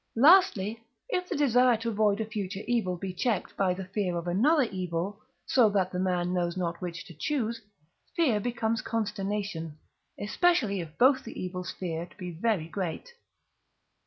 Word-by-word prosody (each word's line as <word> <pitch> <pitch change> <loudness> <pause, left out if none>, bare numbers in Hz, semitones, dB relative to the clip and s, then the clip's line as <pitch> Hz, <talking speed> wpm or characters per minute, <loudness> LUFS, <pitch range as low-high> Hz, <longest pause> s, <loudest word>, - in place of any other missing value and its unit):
Lastly, 230 - +5 0.3
if 360 -6 -1
the - - -1
desire 250 -4 +4
to 230 +1 -3
avoid 210 -1 +2
a 220 - -1
future 205 -3 -4
evil 215 -7 0
be 185 +1 -5
checked 210 +1 -1
by 190 -2 +2
the 190 0 -6
fear 185 -2 -2
of 170 - -4
another 265 - +4
evil, 185 -1 -3 0.3
so 240 -5 +4
that 190 -2 +1
the 180 - -3
man 180 -1 0
knows 175 -1 -1
not 170 -1 -2
which 170 -2 -5
to 170 - -11
choose, 230 - -2 0.5
fear 265 -11 +3
becomes 230 0 -1
consternation, 200 -7 -3 0.4
especially 220 - +2
if 160 -1 -10
both 260 +2 +5
the 230 - -8
evils 180 -1 -4
feared 170 -2 -5
be 180 -3 -6
very 175 -1 0
great. 180 - -4
200 Hz, 160 wpm, -28 LUFS, 180-230 Hz, 0.5 s, Lastly